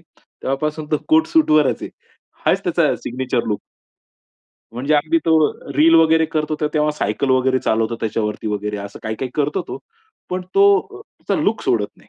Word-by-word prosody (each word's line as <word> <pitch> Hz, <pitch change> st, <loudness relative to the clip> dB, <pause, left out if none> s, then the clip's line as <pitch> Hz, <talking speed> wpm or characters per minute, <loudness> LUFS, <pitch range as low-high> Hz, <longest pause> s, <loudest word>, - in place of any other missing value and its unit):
तेव्हापासून 150 Hz, +3 st, -5 dB
तो 150 Hz, -, +3 dB
कोट 320 Hz, +1 st, +4 dB
सूटवरच 155 Hz, -, +3 dB
आहे. -, -, -6 dB, 0.6 s
हाच -, -, +2 dB
त्याचा -, -, +2 dB
सिग्नेचर 125 Hz, 0 st, -3 dB
लुक. 105 Hz, -, -1 dB, 1.1 s
म्हणजे 135 Hz, +6 st, 0 dB
अगदी 155 Hz, +3 st, +2 dB
तो 165 Hz, -, +2 dB, 0.4 s
रील 165 Hz, +2 st, +5 dB
वगैरे 160 Hz, 0 st, +5 dB
करतो 155 Hz, 0 st, -1 dB
ते 150 Hz, -, +1 dB
तेव्हा 150 Hz, 0 st, +2 dB
सायकल 105 Hz, +6 st, -1 dB
वगैरे 130 Hz, 0 st, +2 dB
चालवतो 115 Hz, +1 st, 0 dB
त्याच्यावरती 110 Hz, -1 st, -2 dB
वगैरे 105 Hz, 0 st, -3 dB
असं 100 Hz, -, -12 dB
काही-काही 110 Hz, +4 st, -4 dB
करतो 150 Hz, 0 st, 0 dB
तो. -, -, -5 dB, 0.5 s
पण 185 Hz, 0 st, -2 dB
तो 395 Hz, -, +6 dB, 0.2 s
अ, 400 Hz, -1 st, -13 dB, 0.3 s
त्याचा -, -, 0 dB
लुक -, -, 0 dB
सोडत -, -, +1 dB
नाही. -, -, -23 dB
145 Hz, 165 wpm, -19 LUFS, 120-160 Hz, 1.1 s, तो